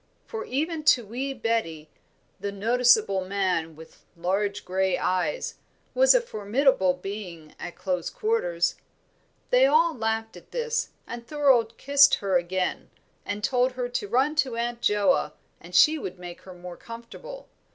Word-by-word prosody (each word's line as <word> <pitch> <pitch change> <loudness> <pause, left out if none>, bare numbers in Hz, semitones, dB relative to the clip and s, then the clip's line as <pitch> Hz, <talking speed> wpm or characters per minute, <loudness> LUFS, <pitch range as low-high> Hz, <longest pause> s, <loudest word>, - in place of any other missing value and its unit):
For, 450 -2 -6
even 310 +5 -2
to 245 -6 +5
wee 255 +6 -4
Betty, 225 - -2 0.5
"the 200 +1 -3
noticeable 220 -2 +3
man, 185 -4 -1
with 160 +1 -15
large 200 +4 -1
grey 190 0 0
eyes" 185 - -2 0.3
was - - +5
a - - +4
formidable 215 - +1
being 180 -5 -8
at 175 - -7
close 180 -3 -2
quarters. 460 +3 0 0.8
They 255 +2 +6
all 325 +4 +3
laughed 225 -2 -2
at - - -14
this; 475 -1 -2 0.2
and 235 0 -8
Thorold 260 -7 +2
kissed 285 0 +5
her 195 -3 -2
again, 180 +1 -1 0.4
and 205 +1 -4
told 250 +2 +2
her 250 -1 -3
to 225 -4 -3
run 260 +8 +2
to 260 -5 +1
Aunt 235 0 -3
Joa 210 +6 +2 0.3
and - - -11
she 310 0 +6
would 185 -9 -6
make 175 -1 -9
her 185 - -11
more 175 0 -10
comfortable. 240 - -10
225 Hz, 150 wpm, -26 LUFS, 190-275 Hz, 0.8 s, They